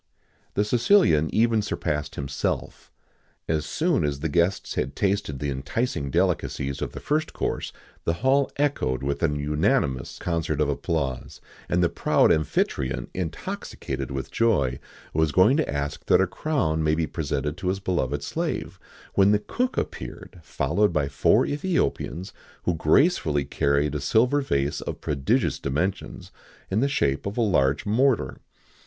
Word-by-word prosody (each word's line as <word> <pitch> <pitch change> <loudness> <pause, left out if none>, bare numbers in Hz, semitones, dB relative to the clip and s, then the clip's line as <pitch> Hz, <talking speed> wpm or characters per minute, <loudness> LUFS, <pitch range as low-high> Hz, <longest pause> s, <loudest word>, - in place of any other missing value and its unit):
The 105 - +2
Sicilian 115 - +4
even 115 0 +3
surpassed 75 -7 -3
himself. 70 0 -3 0.6
As 80 -1 -1
soon 165 - +1
as 70 -1 -2
the 80 - -1
guests 85 +5 +1
had 65 - -2
tasted 100 -7 0
the 70 +1 -2
enticing 70 - -2
delicacies 70 +1 0
of - - -3
the - - -6
first 155 +1 -1
course, - - -2 0.3
the 85 - +1
hall 135 +1 +4
echoed 135 - 0
with 70 +1 -2
an 75 -3 +1
unanimous 70 -2 0
concert 85 -4 -2
of 75 -1 +2
applause, 70 -3 -2 0.3
and 90 0 +2
the - - +5
proud - - +3
Amphitryon, 70 -3 0
intoxicated 70 -5 -4
with 65 -1 -5
joy, 70 - +2 0.3
was 80 -1 +2
going 95 - +5
to 160 - 0
ask 70 0 -3
that - - +5
a - - +4
crown 130 - -1
might 80 0 +2
be 80 - +1
presented 75 -2 -2
to 90 - -4
his 95 +1 0
beloved 75 -7 -1
slave,[XIX - - -3
65] - - -23
when 100 +1 +5
the - - +5
cook 250 - -2
appeared, 90 - -5
followed 105 +5 +1
by 75 -4 0
four 70 -1 +3
Ethiopians, 145 - -1 0.3
who 90 - +1
gracefully 80 - +2
carried 70 +1 +1
a 75 - -2
silver 125 - +3
vase 70 - -1
of - - -5
prodigious 70 -2 0
dimensions, 75 +8 -3 0.4
in 100 - +2
the 140 +4 +2
shape 75 - 0
of 100 - -5
a - - +2
large 75 -10 +2
mortar. 115 - +1
80 Hz, 155 wpm, -25 LUFS, 70-105 Hz, 0.6 s, the